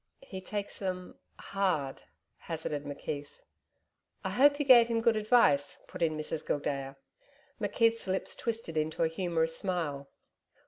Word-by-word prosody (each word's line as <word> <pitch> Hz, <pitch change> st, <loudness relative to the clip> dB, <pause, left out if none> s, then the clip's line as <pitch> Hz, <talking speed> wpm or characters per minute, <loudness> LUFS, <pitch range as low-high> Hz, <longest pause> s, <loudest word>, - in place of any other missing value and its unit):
'He 190 Hz, -1 st, -8 dB
takes 205 Hz, +1 st, -5 dB
them 185 Hz, -2 st, -4 dB, 0.2 s
hard,' 180 Hz, -9 st, -1 dB, 0.4 s
hazarded 155 Hz, -3 st, -4 dB
McKeith. 145 Hz, 0 st, -6 dB, 0.8 s
'I -, -, -1 dB
hope 285 Hz, +3 st, +5 dB
you 290 Hz, -, -1 dB
gave 240 Hz, -3 st, +8 dB
him 230 Hz, -1 st, +1 dB
good 230 Hz, 0 st, +3 dB
advice,' 210 Hz, -, +3 dB
put -, -, -9 dB
in 160 Hz, -2 st, +1 dB
Mrs 155 Hz, 0 st, -3 dB
Gildea. 140 Hz, -2 st, -2 dB, 0.7 s
McKeith's 225 Hz, +1 st, +1 dB
lips 190 Hz, 0 st, -1 dB
twisted 225 Hz, -9 st, -3 dB
into 155 Hz, +1 st, 0 dB
a -, -, +4 dB
humorous 165 Hz, -1 st, 0 dB
smile. 160 Hz, -8 st, -2 dB
175 Hz, 135 wpm, -31 LUFS, 150-215 Hz, 0.8 s, gave